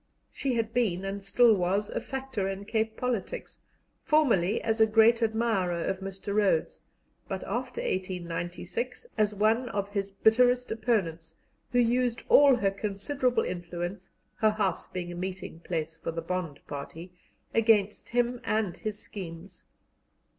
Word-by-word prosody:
She 265 -3 -1
had 225 -1 -1
been, 195 -7 +1
and 195 0 -4
still 225 +4 +5
was, 195 +2 0
a - - -2
factor 265 -7 -3
in 195 +1 -5
Cape 220 0 -1
politics, 250 -5 -3 0.4
formerly 230 - +3
as 225 0 +1
a 220 - +7
great 225 +2 +5
admirer 220 -6 +1
of 190 - -2
Mr. 195 +1 -5
Rhodes, 200 -6 +1 0.5
but 190 -1 -4
after 245 +4 -3
1896 180 - -3
as 210 -1 +1
one 225 +4 +2
of 200 -2 -2
his 200 -1 -2
bitterest 245 +5 +3
opponents, 180 -8 -1 0.4
who 245 - +1
used 245 0 +2
all 280 -2 +8
her 200 -5 +1
considerable 215 +6 -1
influence 175 +2 -5 0.3
her 215 - +4
house 210 -4 -1
being 175 -1 -5
a - - -6
meeting 185 -1 -5
place 165 -1 -4
for - - -5
the 165 0 -4
Bond 170 -4 -3
party 160 +5 -7 0.4
against 215 -3 +2
him 245 0 0
and 215 -4 0
his 215 -1 -4
schemes. 180 -3 -9
205 Hz, 145 wpm, -28 LUFS, 185-230 Hz, 0.5 s, all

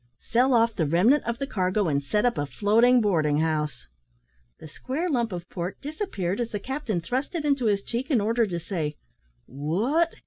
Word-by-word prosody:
"Sell 250 +2 +2
off 230 0 +3
the 160 - 0
remnant 205 - +4
of 235 0 -2
the 275 - -2
cargo, 190 -4 0
and 140 -2 +1
set 210 - 0
up 240 -1 +2
a 145 - -2
floating 225 - +4
boarding 155 -8 +2
house." 155 -1 -1 0.7
The - - -11
square 270 - -4
lump 235 -5 0
of 175 -1 -6
pork 180 +1 -5
disappeared, 275 - -3
as 235 - -2
the 205 - -4
captain 250 - -3
thrust 260 - -3
it 315 -3 -2
into 280 -4 +1
his 200 -2 +1
cheek 245 +3 -4
in 265 -7 +3
order 225 +2 +1
to 175 -3 -3
say, 160 -4 -3 0.5
"What?" 210 - 0
210 Hz, 195 wpm, -26 LUFS, 170-255 Hz, 0.7 s, remnant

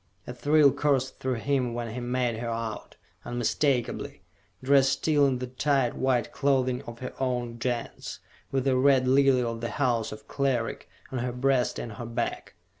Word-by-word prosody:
A 125 - -6
thrill 145 +2 +4
coursed 135 -2 0
through 130 -1 -1
him 130 -4 +1
when 120 -2 -4
he 125 - -4
made 125 -1 -1
her 120 0 -3
out, 115 -2 -5 0.3
unmistakably 120 +1 -1 0.4
dressed 135 0 +4
still 145 0 +3
in 130 -2 0
the 125 - -4
tight 130 0 0
white 130 -2 +1
clothing 130 -3 +1
of 120 0 -7
her 130 - -5
own 125 -3 -2
Gens, 120 -1 -4 0.3
with 135 -1 0
the 135 -1 +3
Red 130 -1 +4
Lily 135 -1 +4
of 115 -1 -3
the 115 - -2
house 120 -6 0
of 110 0 -10
Cleric 130 -5 -1 0.2
on 130 - -2
her 125 +1 -2
breast 125 0 +1
and 115 - -5
on 100 - -10
her 120 - -4
back! 115 0 -3
125 Hz, 180 wpm, -27 LUFS, 120-135 Hz, 0.4 s, thrill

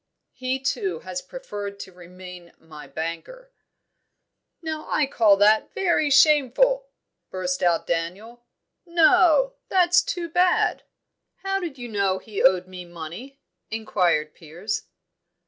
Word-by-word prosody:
"He 255 +1 -2
too 385 - -2
has - - -5
preferred 205 - -7
to 190 - -10
remain 180 0 -12
my 150 -3 -13
banker." 170 - -7 1.1
"Now 315 -2 -6
I 305 - +2
call 220 -6 +3
that 210 +2 +3
very 345 -5 +1
shameful!" 305 - +4 0.4
burst 185 -1 -3
out 175 -2 +2
Daniel. 195 +9 -4 0.4
"No, 345 +7 +4 0.2
that's 360 -1 +4
too 355 -9 -4
bad!" 355 +2 +2 0.6
"How 390 0 -1
did 335 -7 -6
you 245 -1 -7
know 200 -4 0
he 205 0 -6
owed 185 0 +4
me 185 -1 -9
money?" 175 - -10 0.3
inquired 175 -8 0
Piers. 175 +7 -6
220 Hz, 120 wpm, -24 LUFS, -, 1.1 s, shameful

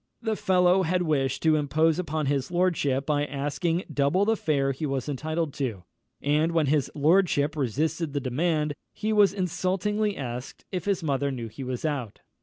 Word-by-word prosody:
The 220 -2 -1
fellow 185 -1 +3
had 180 +1 +1
wished 135 -5 0
to 160 -1 +4
impose 155 +3 +2
upon 155 -3 -2
his 135 -1 0
lordship 170 -7 +1
by 145 -1 +1
asking 145 +5 -1
double 145 +8 +2
the 225 +1 +3
fare 140 -7 +1
he 145 +3 -3
was 135 -1 -2
entitled 155 +2 -2
to; 115 -10 -2 0.4
and 150 +3 +2
when 165 -2 +3
his 145 0 +1
lordship 155 -1 +3
resisted 155 +4 -1
the 145 - 0
demand, 150 +3 0 0.2
he 215 0 -1
was 205 -2 +5
insultingly 195 +3 -1
asked 125 -2 -6
"if 185 - -3
his 195 -3 0
mother 140 -2 0
knew 120 -4 -5
he 120 +6 -8
was 130 +2 -4
out?" 135 -9 -3
155 Hz, 175 wpm, -26 LUFS, 140-180 Hz, 0.4 s, was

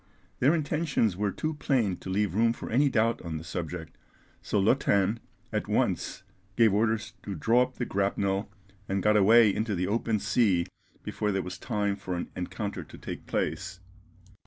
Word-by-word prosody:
Their 145 +6 +4
intentions 155 - 0
were 100 +1 0
too 155 - -2
plain 125 -10 +1
to - - -9
leave 100 -1 0
room 115 +3 +3
for - - -8
any 140 +5 +4
doubt 115 -2 +1
on 80 -2 -4
the 80 - -7
subject, 85 -1 -6 0.4
so - - -1
Lottin 100 -1 +2 0.3
at - - -1
once - - 0 0.3
gave 115 -4 +5
orders 110 +1 0
to 100 - -5
draw 115 +9 +3
up 125 0 -1
the 125 - -2
grapnel, 100 0 -1 0.4
and 95 -1 0
got 105 0 +4
away 105 +1 +6
into 105 0 -1
the 90 +1 0
open 110 +2 0
sea 100 -3 +2 0.4
before 105 -1 -2
there 95 -1 -1
was 90 0 -7
time 105 -4 -1
for 95 -2 -5
an 85 - -5
encounter 95 0 -4
to - - -13
take - - -7
place. 95 +1 -2
105 Hz, 175 wpm, -28 LUFS, 95-115 Hz, 0.4 s, away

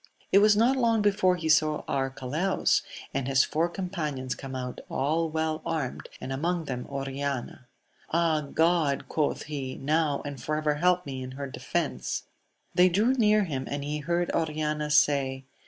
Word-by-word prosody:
It 195 - +7
was 210 0 +5
not 240 +5 +4
long 230 -4 +2
before 195 -3 +3
he 165 -2 -4
saw 155 -1 +3
Arcalaus 135 +6 0 0.3
and 135 -1 -1
his 135 -1 +4
four 165 +3 0
companions 155 -9 -3
come 135 -1 -7
out, 125 -1 -5
all 160 +5 0
well 160 0 -1
armed, 160 -6 -3
and 135 - -5
among 165 +4 -1
them 125 -3 -4
Oriana. 135 -2 -4 0.4
Ah, 165 -2 +2
God! 160 -4 +2
quoth 150 -2 -1
he, 135 -3 -5
now 150 0 0
and 140 -3 -6
for 150 +4 -1
ever 155 -1 +1
help 180 +4 +2
me 135 -2 -5
in 130 0 -6
her 140 +1 -5
defence! 65 - -3 0.5
They 180 +1 +6
drew 210 +8 +3
near 215 -4 +4
him, 135 -7 -3
and 140 0 -3
he 150 +1 -2
heard 170 +3 0
Oriana 150 -1 -1
say. 140 -3 +2
150 Hz, 165 wpm, -28 LUFS, 135-175 Hz, 0.5 s, It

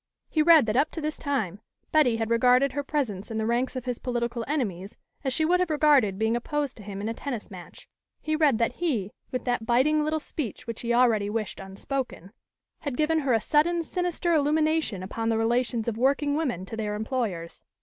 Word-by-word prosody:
He 310 - +2
read 320 -4 +7
that 215 0 -1
up 290 +4 +3
to - - -4
this 305 0 -3
time, 220 - -2 0.3
Betty 270 -7 +4
had 225 0 -2
regarded 250 +3 +4
her 285 +2 -2
presence 250 -10 -3
in 225 - -4
the 220 - -1
ranks 240 +4 0
of 255 -1 -4
his 250 -2 -3
political 240 -1 -2
enemies 210 - -3 0.3
as 265 - 0
she 315 +5 +2
would 360 +3 +3
have 365 -2 +1
regarded 290 -10 +4
being 220 +2 +1
opposed 285 +3 -2
to - - -10
him 200 0 -6
in 210 - -3
a 225 - -1
tennis 240 -4 -6
match. 180 -2 -11 0.3
He 310 - -1
read 300 -6 +3
that 230 +1 +1
he, 230 - 0 0.2
with 255 - -3
that 245 -3 -1
biting 300 +6 +3
little 310 +1 0
speech 295 - -6
which 230 -1 -6
he 235 - -2
already 235 -4 +3
wished 215 -1 -3
unspoken, 195 +1 -5 0.5
had 280 -4 -4
given 315 +1 +2
her 275 -4 +1
a 225 - +4
sudden, 335 +6 +2
sinister 355 0 -1
illumination 310 - +1
upon 225 +4 -3
the 225 - +1
relations 235 0 0
of 230 -1 -2
working 280 +3 +2
women 255 - -2
to 225 - -7
their 210 -2 -2
employers. 215 -7 -3
245 Hz, 210 wpm, -26 LUFS, 220-300 Hz, 0.5 s, read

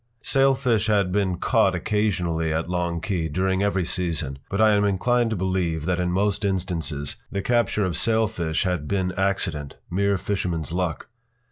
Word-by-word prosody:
p> 115 0 -27
Sailfish 130 -5 +2
had 100 -4 +2
been 95 -2 0
caught 100 -2 +2
occasionally 90 -5 0
at 80 +2 -1
Long 85 -1 -1
Key, 85 -3 -1
during 95 +4 0
every 100 -3 +1
season. 80 -7 -2
But 100 - -2
I 110 0 +6
am 105 -1 +3
inclined 115 +4 +2
to 110 - -1
believe 90 -4 -1
that, 90 0 0
in 90 0 0
most 100 +3 0
instances, 85 -7 -2
the 100 -1 -2
capture 115 -4 +1
of 90 - -2
sailfish 110 -8 +1
had 90 -6 -1
been 95 -2 0
accident—mere 95 +1 -1
fisherman’s 90 -4 -2
luck. 90 -3 -2
95 Hz, 160 wpm, -24 LUFS, 85-105 Hz, -, I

